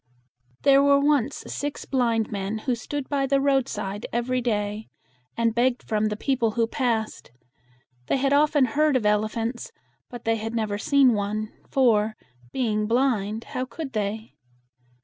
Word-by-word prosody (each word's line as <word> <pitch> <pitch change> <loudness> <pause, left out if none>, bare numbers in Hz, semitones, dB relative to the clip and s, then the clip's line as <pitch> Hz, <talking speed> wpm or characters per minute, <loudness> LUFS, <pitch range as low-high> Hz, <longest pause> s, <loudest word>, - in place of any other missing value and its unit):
There 275 0 +6
were 280 0 +5
once 285 -2 +1
six 290 0 -4
blind 235 -4 0
men 200 +1 -3
who 255 - +1
stood 265 +4 -5
by 275 -2 0
the 275 +1 +2
road 270 -1 +2
side 205 -1 -4
every 250 +2 -1
day, 210 -2 -2 0.5
and 230 -1 +2
begged 240 +1 +1
from 215 -1 0
the 210 0 -3
people 235 -3 0
who 230 - +3
passed. 230 -3 -2 0.8
They - - +1
had 275 +1 +1
often 290 -1 +4
heard 295 +4 +2
of 240 -4 +1
el 210 0 +3
e - - -1
phants, 230 +2 -4 0.4
but 245 -2 -9
they 225 0 +2
had 225 +1 -5
never 210 -3 -1
seen 275 0 +4
one; 210 +1 -2 0.2
for, 220 -5 +2 0.4
being 215 -4 0
blind, 225 -3 0
how 255 - -4
could 265 +3 -7
they? 215 +1 -3
235 Hz, 165 wpm, -25 LUFS, 215-270 Hz, 0.8 s, There